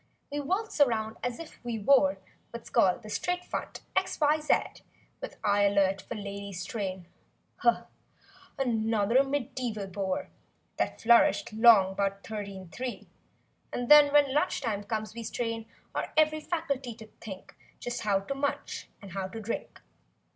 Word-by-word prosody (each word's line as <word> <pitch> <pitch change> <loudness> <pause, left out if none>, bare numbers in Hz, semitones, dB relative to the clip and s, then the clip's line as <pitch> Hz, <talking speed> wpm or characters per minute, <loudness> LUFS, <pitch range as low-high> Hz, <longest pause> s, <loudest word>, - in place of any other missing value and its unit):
We 290 - -2
waltz 375 +4 -1
around 220 -4 +2
as 245 -1 -2
if 330 -5 -11
we 240 -2 -3
wore 200 -4 +4 0.3
What's 235 -1 -9
called 185 +4 +3
the 215 - -9
"straight 360 +6 -1
front - - -5
X 380 0 0
Y 300 0 +4
Z;" 300 -1 0 0.4
With - - -7
eye 205 0 +3
alert 195 -1 +2
for - - -7
lady's 200 -3 -6
train— 190 -4 -4 1.5
(Another 230 -1 +2
medieval 250 -6 -3
bore 190 0 -3 0.5
That - - -1
flourished 235 +1 +4
'long 215 -4 +6
'bout 195 0 -1
thirteen 200 -4 -6
three) 250 +7 -6 0.6
And 245 -1 -3
then 295 -1 +9
when 285 -2 +4
lunch 295 - +1
time 210 -5 -2
comes 215 0 -3
we 235 - -6
strain 230 -1 -3 0.3
Our - - -3
every 310 0 +4
faculty 280 -7 -3
to 220 -1 -11
think 195 -4 -9 0.2
Just 245 0 -4
how 200 -3 +1
to 195 - -4
munch 280 +1 -3
and 195 - -10
how 190 +1 -3
to 225 +4 -8
drink. 225 +1 -5
230 Hz, 150 wpm, -29 LUFS, 200-275 Hz, 1.5 s, then